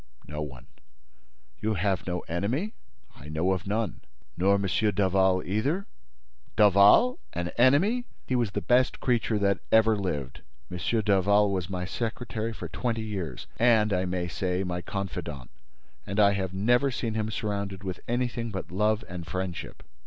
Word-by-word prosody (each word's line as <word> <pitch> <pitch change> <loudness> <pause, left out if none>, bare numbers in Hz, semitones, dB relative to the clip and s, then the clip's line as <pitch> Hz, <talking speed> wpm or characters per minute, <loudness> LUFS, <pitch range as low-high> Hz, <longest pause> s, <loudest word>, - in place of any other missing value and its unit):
"No 75 +1 -5
one." 65 -5 -7 0.9
"You 110 0 0
have 95 -1 -1
no 90 -1 -2
enemy?" 120 - -2 0.4
"I 75 - -11
know 80 +5 0
of 95 0 -2
none." 105 +1 -2 0.3
"Nor 95 +3 +3
M. 100 - -1 0.3
Daval 95 -1 +3
either?" 135 - 0 0.7
"Daval! 105 - +6
An 90 0 -2
enemy? 165 - +3 0.2
He 130 - -1
was 120 -4 +1
the - - -1
best 125 +1 +3
creature 115 -3 +1
that 100 -2 +2
ever 110 0 +5
lived. 75 -10 -3 0.3
M. 90 - -4 0.3
Daval 100 +1 +4
was 95 -2 -2
my 90 -1 -3
secretary 115 +1 -3
for 110 - -6
twenty 115 -3 -2
years 100 -7 -5
and, 110 -3 +4
I 90 0 +1
may 90 -1 -2
say, 90 +3 -1
my 90 -1 -3
confidant; 90 -10 -5 0.6
and 100 +3 -2
I 100 -1 +6
have 95 -2 -2
never 120 +8 +2
seen 120 -3 -3
him 110 0 -1
surrounded 100 -3 -3
with 95 -2 -4
anything 120 -1 -1
but 95 -3 -6
love 105 +3 +1
and 85 -2 -7
friendship." 90 0 -5
100 Hz, 155 wpm, -27 LUFS, 90-115 Hz, 0.9 s, Daval